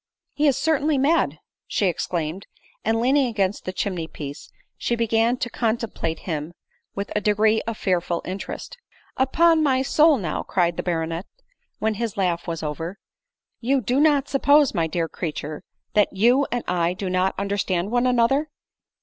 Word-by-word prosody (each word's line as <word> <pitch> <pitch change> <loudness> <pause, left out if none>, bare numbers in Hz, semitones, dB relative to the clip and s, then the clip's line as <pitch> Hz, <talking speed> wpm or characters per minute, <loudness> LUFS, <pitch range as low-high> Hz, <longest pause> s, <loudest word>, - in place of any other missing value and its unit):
" - - -55
He 300 +1 +2
is 270 -2 +3
certainly 310 -2 +1
mad 275 - +2 0.2
!" - - -69
she 205 - 0
exclaimed; 175 0 -2 0.4
and 225 0 +1
leaning 265 +3 +3
against 200 -4 -1
the 185 - -2
chimney 185 -3 -3
piece, 145 -3 -8 0.3
she 240 - -1
began 230 +1 +2
to 245 - -2
contemplate 225 -8 -2
him 160 -1 -4 0.4
with 200 +1 -4
a 210 - +1
degree 215 +1 +3
of 230 -2 -3
fearful 175 -2 -1
interest. 195 - -6 0.2
" - - -33
Upon 330 +4 +4
my 265 -3 +2
soul! 305 +2 +4
now," 170 -9 -2
cried 175 -2 0
the - - -2
baronet, 165 0 -2 0.5
when 220 0 0
his 220 -1 -4
laugh 175 -3 0
was 165 -1 -3
over, 165 +5 -4 0.3
" 485 - -61
you 265 +3 +2
do 250 +3 0
not 290 -2 +4
suppose, 285 0 +4
my 165 -4 +1
dear 165 +1 -1
creature, 155 -2 -5 0.3
that 210 -1 +3
you 245 +8 +3
and 245 0 -1
1 175 0 +1
do 195 0 -4
not 185 +1 +1
understand 200 -1 -1
one 245 +1 +2
another 250 +5 +2
210 Hz, 175 wpm, -23 LUFS, 175-255 Hz, 0.5 s, Upon